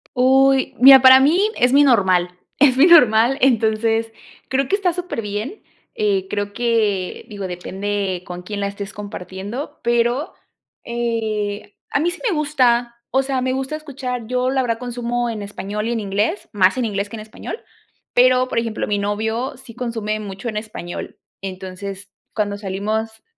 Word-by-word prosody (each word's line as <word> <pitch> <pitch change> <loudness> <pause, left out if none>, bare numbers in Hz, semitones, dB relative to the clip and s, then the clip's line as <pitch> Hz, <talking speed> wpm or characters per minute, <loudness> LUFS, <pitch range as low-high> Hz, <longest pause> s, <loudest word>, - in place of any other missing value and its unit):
Uy, 265 +1 +3
mira, 265 +1 +9
para 260 0 +9
mí 305 +7 +4 0.2
es 245 +1 +3
muy 290 +1 +7
normal 185 -8 +2 0.2
es 265 -2 +5
muy 295 - +7
normal, 250 -6 +6
entonces 225 -2 +2 0.4
creo 265 0 0
que 400 - +2
está 370 -4 0
súper 355 -10 -4
bien, 210 - -5 0.3
eh, 195 -3 0
creo 205 0 -3
que 220 -6 0
digo, 200 -4 -6
depende 190 +1 -3
con 180 0 -8
quién 205 +2 -5
la 200 - -1
estés 200 0 -7
compartiendo, 205 +6 -7
pero, 240 +6 0 0.5
eh, 220 -4 -3 0.2
a - - 0
mí 345 +3 +1
sí 370 - -10
me 355 - 0
gusta, 245 -5 +1
o 265 +2 +2
sea, 265 -1 -1
me 255 0 0
gusta 265 +3 -3
escuchar, 255 -6 -5
yo 255 +1 0
la 265 -1 +1
verdad 230 -2 -1
consumo 240 0 -3
en 220 -2 -4
español 205 +1 -5
y - - -1
en 230 - -1
inglés, 210 - -2
más 190 +3 +3
en 250 - 0
inglés 205 -1 -2
que 230 - -7
en 215 - -7
español, 215 - -8 0.5
pero 255 +1 +4
por 230 - 0
ejemplo, 230 -2 -3
mi 205 -1 -1
novio 220 +6 -2
sí 260 -2 -13
consume 225 -3 -3
mucho 200 +2 -7
en 215 - -3
español, 210 -5 -7 0.2
entonces, 195 +1 -7 0.2
cuando 205 -2 -1
salimos 215 +3 -3
225 Hz, 170 wpm, -20 LUFS, 205-255 Hz, 0.5 s, mira